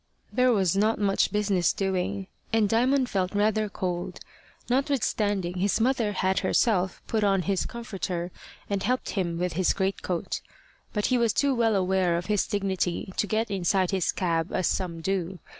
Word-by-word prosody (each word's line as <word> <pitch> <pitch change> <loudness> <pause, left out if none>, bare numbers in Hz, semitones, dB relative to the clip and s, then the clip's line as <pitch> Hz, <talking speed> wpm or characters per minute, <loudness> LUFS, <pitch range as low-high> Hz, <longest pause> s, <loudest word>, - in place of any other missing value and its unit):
There 255 0 +4
was 195 -5 +2
not 215 +3 +2
much 200 -1 +1
business 200 -5 +2
doing. 195 0 -1 0.3
And 220 -2 +3
Diamond 255 +5 +2
felt 190 -3 -1
rather 215 +1 +2
cold, 180 -2 -4 0.5
notwithstanding 210 - 0
his 200 +4 +1
mother 230 -3 +1
had 190 0 +1
herself 190 -6 +1
put 220 -2 0
on 195 -2 +2
his 195 0 0
comforter 185 -6 -4 0.4
and 200 -1 -1
helped 255 +4 -1
him 175 -4 -1
with 180 0 -1
his 185 +2 +2
greatcoat. 190 -3 -2 0.5
But 210 -1 -1
he 250 - +3
was 230 -2 +2
too 280 -1 +2
well 230 -3 +2
aware 185 -2 +2
of 175 - -4
his 210 -1 +1
dignity 190 -2 -1
to 210 - 0
get 220 +1 -1
inside 190 0 +1
his 190 -3 +1
cab 165 -2 -1
as 185 - 0
some 170 -3 -1
do. 185 0 -2
195 Hz, 165 wpm, -27 LUFS, 185-215 Hz, 0.5 s, There